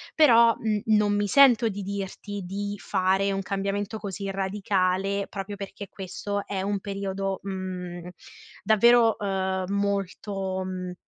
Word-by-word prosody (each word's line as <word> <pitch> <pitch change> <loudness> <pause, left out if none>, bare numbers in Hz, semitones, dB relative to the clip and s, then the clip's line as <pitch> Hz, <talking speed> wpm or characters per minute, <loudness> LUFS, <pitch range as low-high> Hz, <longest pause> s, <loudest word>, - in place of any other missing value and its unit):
Però, 235 -7 +6
mhmm, 215 -2 -1
non 210 -1 +3
mi 205 0 +1
sento 245 0 +6
di 200 -1 -5
dirti 200 0 -5
di 200 +2 -4
fare 190 +2 +1
un 195 - -1
cambiamento 200 +2 -2
così 195 -1 -4
radicale 195 0 0
proprio 200 0 -6
perché 200 0 -8
questo 200 +1 -5
è 195 -2 -2
un 200 +1 -1
periodo, 195 -1 -3
mhmm, 180 -2 -5 0.6
davvero, 230 +1 +5
uhm, 190 -2 -1
molto, 195 -1 -2
mhmm, 185 -1 -5
200 Hz, 130 wpm, -26 LUFS, 190-205 Hz, 0.6 s, Però